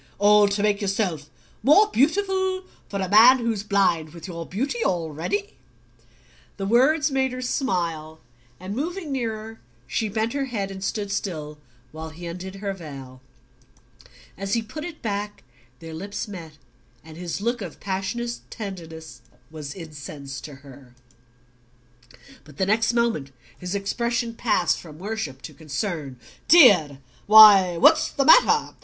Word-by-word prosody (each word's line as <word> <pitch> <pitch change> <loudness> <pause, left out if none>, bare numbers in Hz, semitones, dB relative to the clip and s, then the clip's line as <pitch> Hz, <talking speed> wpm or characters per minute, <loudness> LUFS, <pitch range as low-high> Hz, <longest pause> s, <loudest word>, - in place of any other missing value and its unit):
"All 205 +1 +5
to 200 0 -1
make 210 0 +1
yourself 190 -7 -2 0.3
more 315 +10 +6
beautiful 375 +5 +1 0.3
for 200 - -4
a 190 - -1
man 225 +7 +7
who's 230 -4 -2
blind 180 -6 0
with 170 +2 -9
your 170 -2 -7
beauty 275 - -2
already?" 175 +1 -2 1.0
The 195 - -4
words 285 +8 +3
made 265 -1 0
her 255 - -5
smile, 170 - -2 0.4
and 190 +3 -6
moving 330 +3 -4
nearer 225 -3 -4 0.3
she 215 - -2
bent 220 +2 -2
her 280 -1 -1
head 205 -6 -4
and 190 0 -8
stood 205 0 -3
still 155 -7 -4 0.3
while 160 +1 -7
he 165 +3 -11
undid 180 +3 -7
her 195 0 -4
veil. 135 -7 -10 1.2
As 195 +2 -1
he 230 - -1
put 300 +8 -8
it 340 -2 -9
back 205 -1 -4 0.3
their 165 +2 -10
lips 200 +7 -5
met, 170 -6 -9 0.5
and 160 0 -13
his 175 +1 -5
look 235 +3 -2
of 180 -5 -8
passionate 200 +5 -3
tenderness 160 - -8 0.3
was 150 -2 -8
incense 145 -5 -8
to 145 - -10
her. 130 -2 -15 1.5
But 150 -2 -17
the 190 - +1
next 220 +3 +1
moment 235 - 0 0.3
his 180 +2 -5
expression 235 +4 -2
passed 210 -8 +1
from 155 -3 -12
worship 180 -9 -5
to 155 - -9
concern. 150 - -5 0.3
"Dear! 200 - +6 0.3
Why, 205 -5 +8
what's 315 - +5
the 275 - -1
matter? - - +5
200 Hz, 145 wpm, -24 LUFS, 160-230 Hz, 1.5 s, Why